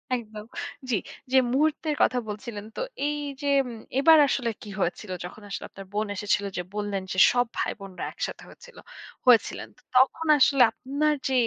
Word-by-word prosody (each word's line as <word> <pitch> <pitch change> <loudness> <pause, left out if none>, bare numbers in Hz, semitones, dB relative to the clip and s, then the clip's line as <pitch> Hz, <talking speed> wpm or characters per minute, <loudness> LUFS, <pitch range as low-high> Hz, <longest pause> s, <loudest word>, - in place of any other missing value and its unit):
একদম। 215 -3 -7 0.4
জি, 230 - +2 0.4
যে 265 - +5 0.2
মুহূর্তের 305 +1 +1
কথা 250 - +3
বলছিলেন। 210 0 -6
তো - - -4 0.3
এইযে 290 -1 -4 0.2
উম 235 -2 -8 0.2
এবার 320 +3 +7
আসলে 245 -4 0
কী 210 - -9
হয়েছিল? 185 +2 -2
যখন 180 - -10
আসলে - - -5
আপনার 195 - -11
বোন 210 0 0
এসেছিল 205 +1 0
যে - - 0
বললেন 205 -2 -2
যে, - - -4
সব 245 0 +2
ভাইবোনরা 195 -4 -4
একসাথে - - -5
হয়েছিল - - -16 0.5
হয়েছিলেন? 245 -3 +4
তো - - -23 0.2
তখন 310 +5 +3
আসলে 275 0 +5
আপনার 285 +5 0
যে 265 - -1
240 Hz, 160 wpm, -26 LUFS, 210-280 Hz, 0.5 s, এবার